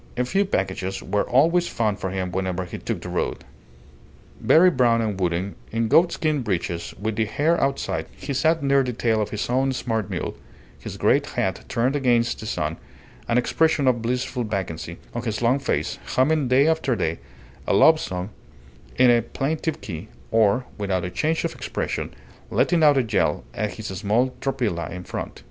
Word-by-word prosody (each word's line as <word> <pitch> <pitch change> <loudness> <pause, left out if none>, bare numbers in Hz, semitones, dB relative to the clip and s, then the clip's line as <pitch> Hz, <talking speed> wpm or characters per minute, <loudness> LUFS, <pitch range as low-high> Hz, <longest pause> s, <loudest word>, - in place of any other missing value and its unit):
A 125 - +1
few 195 +10 +1
packages 95 - -2
were 105 - -1
always 165 +7 +4
found 105 -3 -1
for 95 - -2
him 95 -1 -3
whenever 95 0 -2
he 90 - -7
took - - -4
the - - -6
road. - - -2 1.0
Very 180 +3 +6
brown 120 -5 +3
and 105 -4 -2
wooden, 90 +2 -1 0.2
in 115 0 0
goatskin 155 -2 +3
breeches 85 -5 -3
with 110 +1 -2
the 110 - +2
hair 150 +10 +1
outside, 135 0 -1
he 140 +1 -4
sat 160 +3 +2
near 140 0 +4
the 125 -2 -2
tail 115 -2 +1
of 105 - -2
his 105 - -3
own 130 +2 +1
smart 115 -5 -2
mule, - - -3 0.4
his - - -7
great - - +3
hat - - -2
turned 125 +4 0
against 120 -4 +2
the 110 - -7
sun, 80 -6 -2 0.5
an 115 - +2
expression 145 +3 +2
of 120 -2 +3
blissful 125 +1 -1
vacancy 85 -6 -4 0.2
on 120 - -3
his 110 -3 -3
long 120 +4 +2
face, 135 - -2 0.2
humming 145 +1 +3
day 130 +3 +4
after 160 -6 +1
day 85 -5 -1 0.5
a - - +2
love 160 0 +6
song 90 -2 -4 0.6
in 125 -1 +6
a 120 -1 +4
plaintive 150 +6 -3
key, 90 +1 -6 0.2
or, 115 +3 +3
without 95 -3 -1
a 90 - -4
change 160 - 0
of - - -2
expression, - - -3 0.4
letting 170 -2 +2
out 145 -2 +6
a 130 - +3
yell 105 - 0
at 105 -1 -3
his 110 - -8
small 110 +7 0
tropilla 120 -11 -1
in 90 +1 -7
front. - - -6
115 Hz, 180 wpm, -23 LUFS, 100-135 Hz, 1.0 s, Very